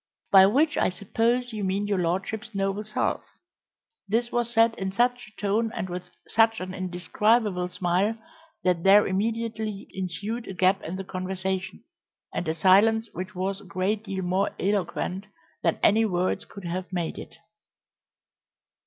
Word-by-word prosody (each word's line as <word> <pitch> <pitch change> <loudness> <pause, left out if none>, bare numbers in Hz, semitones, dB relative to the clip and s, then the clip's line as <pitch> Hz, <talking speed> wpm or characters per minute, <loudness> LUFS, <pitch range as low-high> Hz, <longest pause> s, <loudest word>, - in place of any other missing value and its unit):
"By 190 -1 +9
which 290 +9 +2
I - - +3
suppose 230 +6 0
you 210 -2 -3
mean 195 +2 0
your 205 -2 0
lordship's 195 +6 -2
noble 195 +1 -1
self." 215 0 -1 0.9
This 235 +4 0
was 240 -1 0
said 225 -1 +4
in 190 0 -2
such 245 +4 +1
a 215 - -18
tone 215 +3 +1
and 185 - -3
with 180 0 -6 0.2
such 225 0 +3
an 185 0 -5
indescribable 185 +2 +1
smile 185 +5 0 0.5
that 180 -2 +1
there 200 +2 +7
immediately 220 +1 -2
ensued 195 +6 -4
a 195 - -6
gap 185 +2 +3
in 170 - -5
the 195 - -4
conversation, 190 0 -4 0.5
and 175 - -3
a 160 - 0
silence 210 +6 +4
which 185 +3 -6
was 190 +2 -2
a - - -15
great 190 +4 -1
deal 195 -2 -3
more 185 +3 0
eloquent 190 0 -1 0.3
than 165 - +1
any 220 +2 +5
words 185 -3 0
could 200 -3 -11
have 180 +2 -4
made 175 -3 -3
it. - - -10
195 Hz, 155 wpm, -26 LUFS, 185-220 Hz, 0.9 s, By